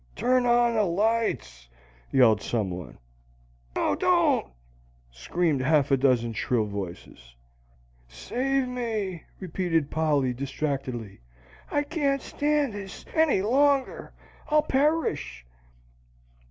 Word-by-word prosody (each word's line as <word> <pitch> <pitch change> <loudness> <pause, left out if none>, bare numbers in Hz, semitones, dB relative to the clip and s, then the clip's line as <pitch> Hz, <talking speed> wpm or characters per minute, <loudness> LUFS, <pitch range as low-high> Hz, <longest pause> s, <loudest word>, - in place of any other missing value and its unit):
"Turn 250 0 +2
on 240 0 +4
the 220 - +2
lights!" 185 - -1 0.4
yelled 115 -6 +5
some 105 -5 -2
one. 90 -1 -8 0.8
"No! - - +1
Don't!" - - +2 0.6
screamed 145 - -1
half 145 +1 +2
a - - +6
dozen 125 -3 +2
shrill 110 +1 0
voices. 90 -11 -8 0.7
"Save 255 - -1
me!" 220 -8 -3
repeated 170 -4 -1
Polly, 145 -5 +1
distractedly. 130 - -4 0.5
"I 290 - 0
can't 285 -3 -1
stand 290 -4 0
this 200 -2 -8
any 315 -12 +3
longer! 275 +4 +1 0.4
I'll 305 0 +4
perish!" 265 - 0
170 Hz, 100 wpm, -26 LUFS, -, 0.8 s, a